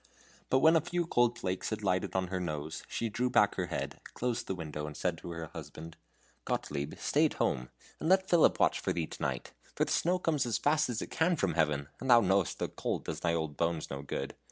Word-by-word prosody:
But 130 - +3
when 160 +1 +7
a 165 - +5
few 175 +2 -1
cold 120 -6 +2
flakes 90 0 -2
had 110 -1 -4
lighted 95 0 0
on 95 -1 0
her 95 0 -2
nose, 80 -1 -4
she 115 - -2
drew 125 +4 0
back 105 -5 +4
her 90 -2 -2
head, 85 - -4 0.2
closed 120 -1 -2
the 95 - -2
window, 75 -3 -5
and 75 - -8
said 90 -2 0
to - - -8
her 85 -1 -5
husband: 80 +1 -8 0.5
"Gottlieb, 70 0 -3
stay - - +2
at - - -7
home, 65 0 -1 0.3
and 160 - -1
let 190 0 +4
Philip 170 -4 +4
watch - - +3
for - - -1
thee 85 -2 -1
to - - -10
night; - - -3 0.2
for - - +2
the - - -4
snow 180 +2 +2
comes 155 -7 0
as 115 - +1
fast 150 -1 +2
as 115 -3 -2
it - - -9
can 170 +2 +2
from 95 - 0
Heaven, 75 -3 +1
and 130 - -4
thou 120 -1 +9
knowest 95 - +2
the - - -1
cold - - -3
does - - -4
thy 85 -1 +1
old 80 -3 -3
bones 85 -1 -1
no 70 0 -4
good. 70 -1 -4
95 Hz, 240 wpm, -31 LUFS, 80-125 Hz, 0.5 s, thou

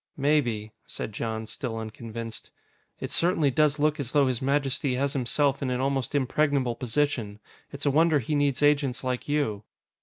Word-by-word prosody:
"Maybe," 125 -7 +1 0.2
said 110 - -5
Jon, 110 +1 -3
still 115 0 -4
unconvinced. 115 0 -6 0.5
"It - - -5
certainly 165 -5 +2
does 150 +2 +3
look 150 0 +1
as 130 -3 -4
though 145 -2 +5
His 130 -3 -1
Majesty 135 -1 +1
has 140 +2 0
himself 140 +1 +1
in 135 - -1
an 125 0 -1
almost 135 0 -1
impregnable 140 -2 +1
position. 120 -4 -1 0.3
It's 140 +1 -4
a 140 - +4
wonder 160 +2 +4
he 140 +2 -2
needs 145 -2 +1
agents 140 -4 +2
like 130 +1 -3
you." 125 -9 0
135 Hz, 170 wpm, -27 LUFS, 120-145 Hz, 0.5 s, though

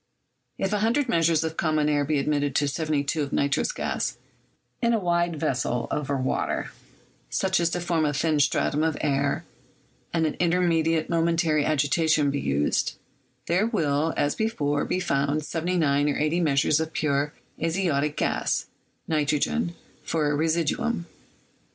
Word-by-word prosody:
If 195 - -1
100 225 +7 +1
measures 165 -5 +2
of 160 0 -4
common 155 -2 +1
air 145 -1 +2
be 150 +1 0
admitted 145 -1 0
to 145 - +2
72 150 0 -1
of 140 - -3
nitrous 140 +1 +1
gas - - -2 0.6
in 235 -1 +2
a 225 - +2
wide 175 -2 +1
vessel 125 -5 -1
over 140 -1 -1
water, 130 0 -1 0.6
such 190 - +1
as 170 -1 +2
to 175 - -2
form 170 -2 0
a 150 - +1
thin 150 +1 +1
stratum 145 +1 +2
of 160 -1 0
air, 140 -1 0 0.7
and 165 -1 +1
an 155 - -2
immediate 165 -2 +2
momentary 165 -2 +2
agitation 155 0 +2
be 140 - -2
used, 70 - 0 0.5
there 185 +6 +2
will, 160 - +1
as 145 0 +1
before, 150 -11 -1
be 185 - -1
found 145 -3 0
79 155 -4 +1
or 145 - -1
80 155 +3 +1
measures 150 -2 +2
of 160 0 -3
pure 145 -1 0 0.3
azotic 160 -4 0
gas - - 0 0.4
[nitrogen] 155 +5 0 0.3
for 150 -3 0
a - - +1
residuum. 170 +6 0
155 Hz, 145 wpm, -25 LUFS, 145-170 Hz, 0.7 s, measures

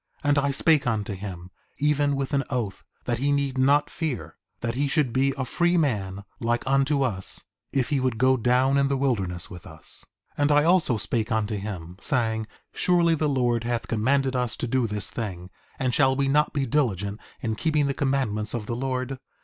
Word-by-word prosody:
4:33 145 - +1
And 145 - +4
I 140 0 +1
spake 145 0 +3
unto 105 -3 -1
him, 95 -2 -7 0.3
even 145 -1 +2
with 135 +2 -3
an 140 -1 +2
oath, 115 -8 -3 0.2
that 120 -2 -1
he 140 +2 +1
need 140 -2 0
not 140 +3 +4
fear; 155 -7 -4 0.3
that 115 -1 -1
he 140 +4 0
should 140 -4 +1
be 135 +1 +2
a 130 - -1
free 175 +7 +1
man 100 - -1 0.2
like 120 0 0
unto 135 +1 +2
us 95 -7 -1 0.3
if 135 +1 0
he 145 -3 +1
would 130 -3 0
go 130 +2 +4
down 130 +3 +3
in 140 - +3
the 140 0 0
wilderness 100 -9 -1
with 90 +2 -10
us. 80 -2 -4 0.4
4:34 - - +1
And 145 +1 +3
I 145 0 +5
also 165 -8 +3
spake 110 +3 -1
unto 110 -1 0
him, 95 -4 -6
saying: 110 -3 +1 0.3
Surely 170 -2 +3
the 155 -1 +1
Lord 120 -4 +1
hath 120 -1 -2
commanded 130 +4 +1
us 125 -2 -1
to - - -3
do 125 0 +1
this 105 -2 -2
thing; 95 -5 -5 0.3
and 130 -2 0
shall 135 -2 +4
we 140 0 +1
not 150 +2 +3
be 140 -2 -1
diligent 105 - 0 0.2
in 110 - -1
keeping 150 +4 +1
the 140 - 0
commandments 125 -6 0
of 110 -3 -3
the 115 - -3
Lord? 130 +1 -3
130 Hz, 205 wpm, -25 LUFS, 110-140 Hz, 0.4 s, I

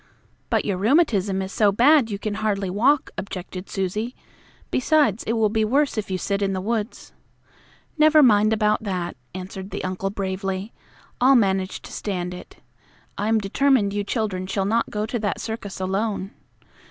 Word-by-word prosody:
"But - - +1
your 195 -3 -1
rheumatism 205 - +2
is 190 - -6
so 210 -1 +3
bad 255 +4 +5
you 200 - -3
can 210 +1 -3
hardly 200 -3 -1
walk," 260 +9 +2
objected 185 -1 -7
Susie. 210 +6 -2 0.6
"Besides, 255 -6 +2
it 225 - 0
will 225 -2 +3
be 220 +1 +1
worse 275 +6 +2
if 215 -2 -3
you 185 - -1
sit 200 +2 -2
in 195 -1 0
the 190 - -2
woods." 220 +3 -3 0.9
"Never 310 0 +6
mind 215 -3 +5
about 215 0 +2
that," 185 -5 -3 0.2
answered 190 +1 -7
the - - -5
uncle 185 +1 -2
bravely. 195 +1 -3 0.5
"I'll 265 +2 +6
manage 190 -4 +1
to - - -10
stand 180 -3 -3
it. 180 - -11 0.6
I 205 - -2
am 225 0 +3
determined 215 +1 +2
you 205 0 -1
children 200 -4 -2
shall 195 0 -1
not 230 +3 +1
go 210 0 -2
to 235 +2 -3
that 205 -4 -2
circus 220 -4 -6
alone. 195 +1 -2
205 Hz, 170 wpm, -23 LUFS, 190-225 Hz, 0.9 s, Never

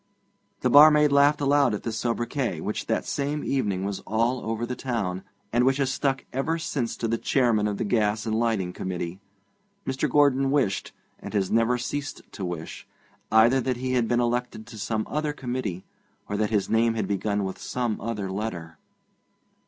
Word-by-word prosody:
The 125 - +2
barmaid 150 +1 +8
laughed 145 +1 +4
aloud 140 -4 +3
at - - -7
this 115 -2 -3
sobriquet, 120 - -1
which - - -4
that - - 0
same 145 +1 -2
evening 100 -8 -1
was 100 -1 -3
all 115 +4 0
over 115 +1 -2
the 125 +1 -4
town, 110 -8 -2 0.3
and 120 +1 +3
which 135 +1 +3
has 135 -1 0
stuck 135 -1 -1
ever 145 +5 0
since 140 -7 -3
to 115 - -2
the 115 0 -1
Chairman 115 -6 +2
of 105 -1 -2
the - - -1
Gas 105 -1 +1
and 110 - -1
Lighting 110 -6 0
Committee. 90 -1 -4 0.7
Mr. 135 0 -1
Gordon 135 -2 +3
wished, 135 -9 0 0.3
and - - -7
has 95 -2 0
never 115 +2 +3
ceased 140 +4 -4
to 100 - -7
wish, 85 -3 -6 0.4
either 115 +4 +5
that 125 0 -1
he 130 +1 -2
had 120 -3 +2
been 120 +1 +2
elected 120 -2 -1
to 115 -1 -11
some 110 +1 -1
other 150 0 -2
committee, 120 -9 -4 0.4
or 100 - -3
that 105 0 0
his 105 -3 +1
name 115 0 +2
had 110 - -1
begun 100 0 -1
with 95 -1 -4
some 120 -3 -2
other 105 -4 -3
letter. 85 -6 -5
115 Hz, 185 wpm, -26 LUFS, 105-135 Hz, 0.7 s, barmaid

